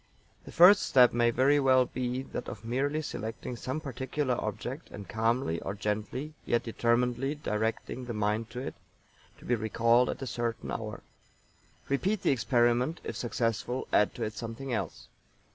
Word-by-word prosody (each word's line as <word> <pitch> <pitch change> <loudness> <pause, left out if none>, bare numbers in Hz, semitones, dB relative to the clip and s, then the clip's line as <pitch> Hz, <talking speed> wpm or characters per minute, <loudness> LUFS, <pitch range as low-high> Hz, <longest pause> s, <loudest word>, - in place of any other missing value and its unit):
The - - -9
first 185 +4 +8
step 125 -2 +5
may 120 0 +3
very 135 +5 +4
well 130 -2 +5
be 125 +1 -3
that - - -6
of 110 +1 -9
merely 140 +6 0
selecting 115 -1 -5
some 130 +5 -3
particular 130 -1 -2
object - - -5
and 100 -2 -9
calmly 115 -5 0
or 95 - -4
gently, 110 +8 -3
yet 120 - +1
determinedly 120 +4 +1
directing 115 -1 -2
the 120 - -4
mind 105 +2 0
to 125 +2 -6
it, - - -5 0.6
to - - -15
be 125 - +1
recalled 115 +2 +3
at - - -4
a - - -2
certain 120 -1 -3
hoar. 110 -1 -5 0.8
Repeat 185 +9 0
the - - +4
experiment, 120 +4 +2
if - - -5
successful 120 +1 -2
add 105 - +3
to - - -3
it 110 - -3
something 115 +4 -5
else. 110 - -4
120 Hz, 160 wpm, -30 LUFS, 115-130 Hz, 0.8 s, first